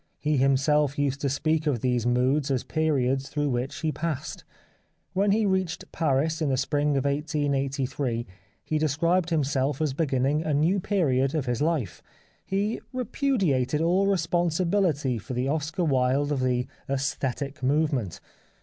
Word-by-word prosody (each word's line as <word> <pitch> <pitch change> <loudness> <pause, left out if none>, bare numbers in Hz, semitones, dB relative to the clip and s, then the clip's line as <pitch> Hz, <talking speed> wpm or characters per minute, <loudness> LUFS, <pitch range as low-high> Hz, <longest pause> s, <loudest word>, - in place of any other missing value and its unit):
He 150 -1 0
himself 140 +2 +2
used 140 -1 0
to 140 - +1
speak 155 +3 0
of 130 -7 0
these 125 -2 0
moods 130 +4 +2
as 130 -3 0
periods 135 -4 0
through 145 -1 -1
which 125 +2 -3
he 160 - 0
has - - -2
passed. 155 -1 -4 0.7
When 200 +2 +2
he 215 +1 +2
reached 190 -3 -1
Paris 155 +1 0
in 155 - +1
the 130 - +1
spring 145 +1 +1
of 135 - -1
1883 140 -4 -1 0.4
he 155 - -1
described 165 +4 +1
himself 145 -3 0
as 155 -4 0
beginning 140 0 +1
a 155 -2 0
new 165 +7 +2
period 145 -9 +1
of 150 -4 -1
his 120 -1 -1
life. 145 - -1 0.4
He 200 +3 -1
repudiated 200 - 0
all 180 +4 +2
responsibility 170 - +1
for 125 +5 -6
the 125 +2 0
Oscar 155 +4 -1
Wilde 135 +1 +1
of 145 - 0
the 125 -1 +1 0.2
aesthetic 140 +1 -2
movement." 135 - 0
145 Hz, 150 wpm, -26 LUFS, 130-160 Hz, 0.7 s, himself